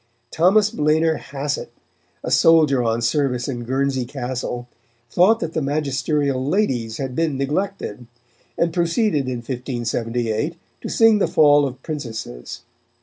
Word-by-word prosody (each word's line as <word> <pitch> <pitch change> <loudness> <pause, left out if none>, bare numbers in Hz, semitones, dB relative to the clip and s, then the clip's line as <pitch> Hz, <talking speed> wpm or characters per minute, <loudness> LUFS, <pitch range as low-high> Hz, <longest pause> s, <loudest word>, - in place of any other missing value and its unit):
Thomas 195 +5 +3
Blener 155 +1 +1
Hasset, 140 +1 -4 0.6
a - - -3
soldier 155 -5 +5
on 115 0 0
service 125 0 0
in 120 -3 -4
Guernsey 130 +1 0
Castle, 125 -1 -5 0.4
thought 210 +6 +4
that 165 0 -3
the 160 - -1
magisterial 140 -1 -1
ladies 130 - 0
had 130 -2 -4
been 160 -3 0
neglected, 140 - -3 0.5
and 170 -1 +1
proceeded 170 - +1
in 125 -2 -3
1578 120 +1 -2 0.3
to - - -5
sing 225 -2 +4
the - - +2
fall 145 -2 +5
of 130 0 -9
princesses. 115 - -6
140 Hz, 130 wpm, -21 LUFS, 125-160 Hz, 0.6 s, soldier